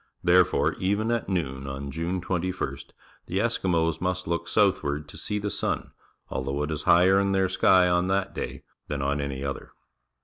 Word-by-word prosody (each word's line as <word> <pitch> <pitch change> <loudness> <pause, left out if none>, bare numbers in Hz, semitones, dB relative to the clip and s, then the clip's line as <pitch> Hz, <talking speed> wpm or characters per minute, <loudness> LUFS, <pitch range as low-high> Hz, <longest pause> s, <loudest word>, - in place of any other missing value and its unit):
Therefore, 90 0 +4
even 100 +4 0
at 120 -3 -1
noon 70 -7 -2
on 70 +1 -5
June 85 +4 -2
21st, 90 -6 -3 0.4
the 95 - -2
Eskimos 85 -7 +1
must 90 0 -1
look 85 0 -2
southward 75 +1 +1
to - - -10
see 105 - -3
the 105 0 -2
sun, - - -2 0.4
although 70 +2 -2
it 75 - -3
is 75 -1 -3
higher 95 +3 +6
in 100 0 +1
their 95 0 +3
^ky 90 -1 +4
on 90 +1 +1
that 95 0 0
day - - -5 0.2
than 70 -1 -3
on 70 +1 0
any 70 -1 -4
other. 70 0 -5
90 Hz, 175 wpm, -26 LUFS, 70-95 Hz, 0.4 s, higher